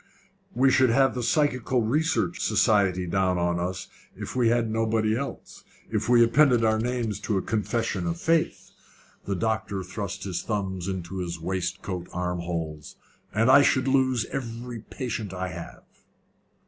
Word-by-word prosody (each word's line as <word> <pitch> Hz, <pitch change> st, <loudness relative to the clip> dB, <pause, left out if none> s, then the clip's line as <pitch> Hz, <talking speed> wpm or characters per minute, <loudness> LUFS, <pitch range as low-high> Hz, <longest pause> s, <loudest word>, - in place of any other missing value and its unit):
"We 130 Hz, +1 st, +4 dB
should 130 Hz, -1 st, +4 dB
have 135 Hz, +3 st, +3 dB
the 125 Hz, -, -3 dB
Psychical 125 Hz, -2 st, +1 dB
Research 160 Hz, +8 st, 0 dB
Society 100 Hz, -4 st, +2 dB
down 90 Hz, +1 st, +1 dB
on 85 Hz, 0 st, 0 dB
us, 90 Hz, +1 st, -3 dB, 0.3 s
if -, -, -7 dB
we 120 Hz, -3 st, +3 dB
had 120 Hz, -1 st, +2 dB
nobody 110 Hz, 0 st, +1 dB
else, 140 Hz, +3 st, -6 dB, 0.3 s
if -, -, -1 dB
we 120 Hz, -1 st, +7 dB
appended 125 Hz, 0 st, +4 dB
our 110 Hz, 0 st, +2 dB
names 115 Hz, -3 st, -2 dB
to 105 Hz, -1 st, -1 dB
a -, -, +1 dB
confession 115 Hz, -, -1 dB
of 170 Hz, 0 st, -2 dB
faith." 165 Hz, -1 st, 0 dB, 0.5 s
The 100 Hz, -, -1 dB
doctor 110 Hz, -2 st, -1 dB
thrust 100 Hz, +2 st, -5 dB
his 90 Hz, -3 st, -3 dB
thumbs 95 Hz, -4 st, -3 dB
into 95 Hz, -1 st, -4 dB
his 85 Hz, -2 st, -4 dB
waistcoat 90 Hz, +1 st, -3 dB
arm 90 Hz, 0 st, -2 dB
holes. 80 Hz, -3 st, -5 dB, 0.4 s
"And 115 Hz, +5 st, +3 dB
I 135 Hz, -, +8 dB
should 130 Hz, -1 st, +2 dB
lose 130 Hz, -3 st, +2 dB
every 120 Hz, -2 st, -5 dB
patient 110 Hz, -4 st, -5 dB
I 90 Hz, 0 st, -3 dB
have." 85 Hz, -2 st, -9 dB
110 Hz, 155 wpm, -26 LUFS, 95-125 Hz, 0.5 s, I